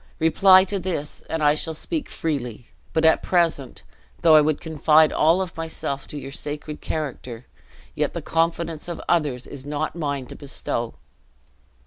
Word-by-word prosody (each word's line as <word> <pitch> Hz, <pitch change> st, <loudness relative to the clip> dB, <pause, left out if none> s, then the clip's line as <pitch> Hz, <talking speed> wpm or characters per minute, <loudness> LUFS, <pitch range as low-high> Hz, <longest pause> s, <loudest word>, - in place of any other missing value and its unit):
Reply 185 Hz, +4 st, +6 dB
to 195 Hz, +1 st, -3 dB
this, 165 Hz, -6 st, -4 dB
and 160 Hz, -1 st, -2 dB
I 145 Hz, 0 st, +5 dB
shall 160 Hz, +1 st, -2 dB
speak 315 Hz, -, -3 dB
freely; 125 Hz, -8 st, -3 dB, 0.3 s
but 160 Hz, 0 st, +1 dB
at 160 Hz, -, +5 dB
present, 165 Hz, -7 st, 0 dB, 0.4 s
though 165 Hz, -2 st, +7 dB
I 155 Hz, -, +8 dB
would 150 Hz, 0 st, +1 dB
confide 155 Hz, 0 st, +3 dB
all 165 Hz, +5 st, +3 dB
of 180 Hz, -, -9 dB
myself 160 Hz, -4 st, -4 dB
to 150 Hz, -, -7 dB
your 135 Hz, -1 st, -7 dB
sacred 150 Hz, +2 st, -5 dB
character, 130 Hz, -6 st, -5 dB, 0.5 s
yet -, -, -1 dB
the -, -, -3 dB
confidence 165 Hz, -1 st, -1 dB
of 170 Hz, -, -5 dB
others 145 Hz, -7 st, +1 dB
is 135 Hz, -, -8 dB
not 150 Hz, +3 st, -3 dB
mine 145 Hz, -5 st, -2 dB
to -, -, -10 dB
bestow." 120 Hz, -4 st, -3 dB
155 Hz, 160 wpm, -23 LUFS, 145-165 Hz, 0.5 s, I